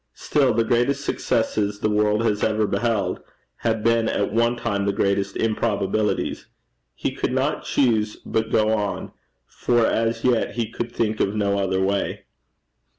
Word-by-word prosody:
Still 135 -4 +2
the 115 +1 +2
greatest 120 +5 +1
successes 105 -2 0
the 110 - 0
world 105 +1 +2
has 105 -2 0
ever 110 0 +2
beheld 115 -1 -1 0.4
had 110 -2 -1
been 115 -1 +2
at - - -1
one 115 +1 +2
time 100 -4 -2
the 100 - +1
greatest 100 0 0
improbabilities! 105 -2 -1 0.5
He - - -2
could - - -2
not - - -1
choose 110 -5 +1
but 110 0 -1
go 110 0 +2
on, 105 -2 -2 0.3
for 120 - +1
as 115 +1 0
yet 125 -3 +1
he 115 -2 -2
could 120 0 -4
think 110 -2 -1
of 100 - 0
no 100 -1 +1
other 95 -1 0
way. 100 +1 -1
110 Hz, 155 wpm, -23 LUFS, 105-115 Hz, 0.5 s, Still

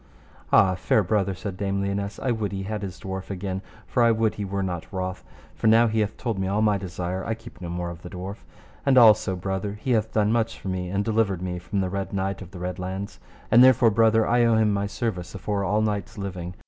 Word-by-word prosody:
Ah! 95 -1 +6
fair 95 +4 +2
brother, 100 0 0
said 95 0 -6
Dame 100 0 -1
Lionesse, 100 +1 -2
I 130 - 0
would 110 -3 -2
he 95 -1 -4
had 105 +1 -4
his 95 -3 -6
dwarf 95 0 -6
again, 95 -1 -4 0.2
for 125 - 0
I 115 - +6
would 110 -1 +2
he 105 - -5
were 100 0 -2
not 90 -3 -4
wroth, 95 -1 -4 0.3
for - - -1
now 115 +2 +6
he 110 -1 0
hath 105 -1 -1
told 115 -6 -2
me 95 - -1
all 105 +3 +1
my 105 -1 +3
desire 90 0 -4
I 110 - -2
keep 115 - -14
no 85 - -5
more 85 0 -3
of 85 0 -10
the 90 - -9
dwarf. 95 +3 -6 0.5
And 135 -2 +3
also, 110 -5 +6
brother, 95 +3 -3
he 130 - -2
hath 110 -2 +1
done 105 -1 +2
much 115 0 0
for 95 - -5
me, 90 -1 -3
and 100 +2 -1
delivered 105 -5 +1
me 90 -1 -3
from 95 +3 -2
the 95 - -1
Red 100 0 -3
Knight 95 0 -2
of 95 - -9
the 95 - -11
Red 90 0 -4
Launds, 95 +2 -5 0.3
and 120 +2 +8
therefore, 125 -3 +6
brother, 110 0 +4
I 120 0 +3
owe 115 -1 +4
him 110 -2 +3
my 100 0 0
service 100 -5 -4
afore 100 +1 -2
all 105 +2 +1
knights 105 +1 -2
living. 90 -3 -5
100 Hz, 245 wpm, -25 LUFS, 95-110 Hz, 0.5 s, and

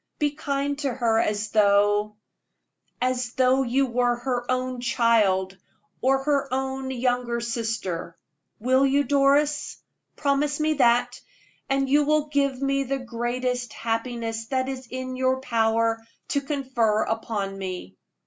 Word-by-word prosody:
Be 295 -2 +1
kind 285 -1 -2
to 280 -3 -1
her 230 -2 +1
as 210 0 0
though 205 0 +3 0.8
as 250 -1 -1
though 260 +1 +3
you 265 +2 +2
were 245 -1 +1
her 245 0 -3
own 255 0 -1
child, 210 -6 +2 0.5
or 270 +1 +2
her 280 -2 0
own 265 0 -2
younger 245 -2 -1
sister. 225 -8 -3 0.4
Will 260 +4 +3
you, 275 +1 +3
Doris? 285 +2 +2 0.4
Promise 290 +1 0
me 310 0 +2
that, 245 -2 +2 0.5
and 270 0 +1
you 290 +2 +4
will 300 0 +1
give 275 -3 0
me 275 0 +1
the 275 +1 -2
greatest 245 0 -3
happiness 225 -1 -3
that 260 0 -1
it - - -2
is 260 -1 -7
in 255 +1 -5
your 260 0 +1
power 230 -2 +1 0.3
to 280 - +1
confer 260 -7 0
upon 210 -3 -3
me." 180 - -6
250 Hz, 140 wpm, -25 LUFS, 230-275 Hz, 0.8 s, you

